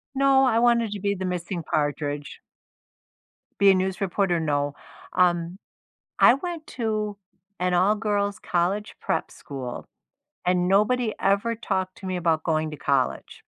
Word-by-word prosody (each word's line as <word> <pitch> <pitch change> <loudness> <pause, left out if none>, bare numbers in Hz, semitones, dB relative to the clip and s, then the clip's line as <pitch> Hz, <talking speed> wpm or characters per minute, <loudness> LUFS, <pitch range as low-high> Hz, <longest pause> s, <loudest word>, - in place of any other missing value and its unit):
No, 270 0 +4
I 230 -2 +3
wanted 235 -2 +3
to 205 - -4
be 200 +1 0
the 190 0 -4
missing 180 -1 -3
Partridge. 145 -1 -2 1.2
Be 200 -1 +7
a - - +4
news 190 0 -1
reporter, 190 -2 +1
no, 145 -2 -1 0.4
um, 175 -1 +2 0.6
I - - +7
went 335 +1 -5
to 215 -2 -1 0.4
an 180 0 +1
all-girls 205 +1 +1
college 190 +5 -1
prep - - -1
school 130 -3 -7 0.6
and 180 0 +2
nobody 215 +4 +2
ever 200 +4 +1
talked 185 -4 -3
to - - -10
me 185 -1 -2
about 165 -2 +1
going 155 -1 0
to 150 - -7
college. 135 - -1
190 Hz, 140 wpm, -25 LUFS, 170-210 Hz, 1.2 s, Be